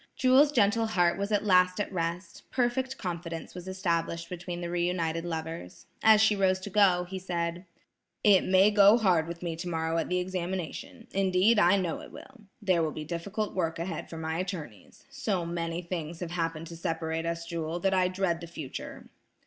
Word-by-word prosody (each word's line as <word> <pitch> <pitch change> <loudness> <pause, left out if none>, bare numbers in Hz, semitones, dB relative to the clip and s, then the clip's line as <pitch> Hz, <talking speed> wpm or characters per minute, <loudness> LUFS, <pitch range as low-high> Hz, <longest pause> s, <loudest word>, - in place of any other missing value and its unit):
Jewel's 265 +3 +5
gentle 225 -2 +3
heart 175 -5 +2
was 200 +2 -2
at 210 0 +1
last 180 -1 +4
at 205 - -2
rest; 170 0 -4
perfect 260 +1 0
confidence 170 -3 -5
was 180 0 -9
established 170 -3 -2
between 175 0 -5
the 175 -1 -4
re 175 0 0
united 165 -2 -1
lovers. 160 - -6 0.2
As 220 -1 +6
she 220 -1 +4
rose 190 -1 +2
to 200 - -7
go, 190 -3 +4
he 190 +1 -5
said: 175 -1 -3 0.6
"It 200 -3 +6
may 190 +2 +5
go 205 +1 +7
hard 180 -8 +2
with 170 +1 -7
me 170 -2 -2
tomorrow 165 -1 -2
at - - -2
the 180 - +1
examination; 180 -1 -4
indeed, 195 +3 +3
I 200 0 +5
know 180 -4 -2
it - - -12
will. 255 -5 -13 0.2
There 185 -4 +3
will 160 - +1
be 155 0 -6
difficult 200 +7 -3
work 165 -3 -1
ahead 170 -1 -5
for 165 - -7
my 160 +1 -3
attorneys. 165 - -7
So 210 -11 -2
many 170 0 -3
things 170 -2 -5
have 175 -2 -4
happened 165 -2 -2
to 170 - -8
separate 165 0 -2
us, 170 0 -3
Jewel, 170 0 -3
that 195 +1 +2
I 185 -1 +3
dread 185 -2 -1
the 170 - -7
future." 155 -5 -8
180 Hz, 190 wpm, -29 LUFS, 165-195 Hz, 0.6 s, go